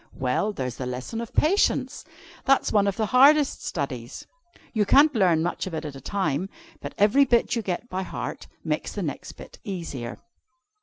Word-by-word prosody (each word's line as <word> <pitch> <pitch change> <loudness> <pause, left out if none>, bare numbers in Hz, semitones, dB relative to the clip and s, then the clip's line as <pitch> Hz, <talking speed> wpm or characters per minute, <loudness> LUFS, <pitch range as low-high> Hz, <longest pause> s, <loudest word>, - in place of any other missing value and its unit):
"Well, 130 +11 0
there's 125 - -4
the 130 - -4
lesson 130 - -5
of 235 - -7
Patience. 385 +7 +1 0.4
That's 275 0 +3
one 205 -2 +3
of 195 - -1
the 220 - +1
hardest 275 +5 +4
studies. 130 -6 -5 0.5
You 215 -3 +2
can't 290 +9 +5
learn 180 -8 +3
much 175 +3 -2
of 175 - -5
it 155 0 -4
at 145 -2 -6
a 135 - -10
time, 185 0 -1 0.3
but - - -7
every 210 +8 +5
bit 245 -1 +2
you 230 - -1
get 190 +3 -4
by 190 -4 -3
heart, 190 - -6 0.2
makes - - -2
the - - -3
next - - -5
bit - - -13
easier. 165 - -5
195 Hz, 185 wpm, -25 LUFS, 145-235 Hz, 0.5 s, can't